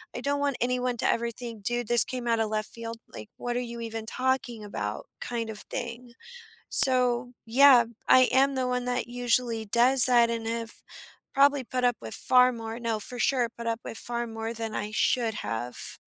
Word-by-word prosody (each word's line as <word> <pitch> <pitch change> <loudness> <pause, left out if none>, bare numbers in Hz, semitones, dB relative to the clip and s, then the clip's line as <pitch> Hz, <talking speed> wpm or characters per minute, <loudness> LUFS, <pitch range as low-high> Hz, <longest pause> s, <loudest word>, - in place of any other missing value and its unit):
I - - -5
don't 285 0 -1
want 285 -2 0
anyone 250 0 -1
to - - -1
ever 235 0 0
think, 230 -3 -9
"Dude, 240 +2 -2
this 240 -1 +5
came 250 -2 -6
outta 230 -1 +1
left 215 0 -3
field, 230 0 -8
like, 110 - -9
what 240 0 -4
are - - 0
you 235 -1 -6
even 225 -1 -6
talking 255 -2 -2
about," 105 - -5
kind 230 -2 -4
of 215 -1 -7
thing. 240 0 -6 0.6
So, 250 -2 +6 0.2
yeah, 255 0 +6 0.2
I 255 -1 +6
am 275 +1 +3
the 260 -1 -1
one 250 0 -2
that 250 0 -2
usually 240 -2 -1
does 245 +4 +4
that, 240 -2 +4
and 230 -1 -3
have 230 0 -4 0.6
probably 280 0 +3
put 250 +1 -4
up 245 -1 +2
with 110 -1 -7
far 250 0 +4
more 225 -1 -7
no, 230 -2 -2
for 245 +4 -4
sure, 250 -2 +1
put 235 0 -6
up 230 0 -1
with - - -7
far 240 0 -3
more 225 0 -5
than 225 -1 -5
I 210 - -3
should 225 0 0
have. 120 - -5
240 Hz, 195 wpm, -27 LUFS, 225-250 Hz, 0.6 s, So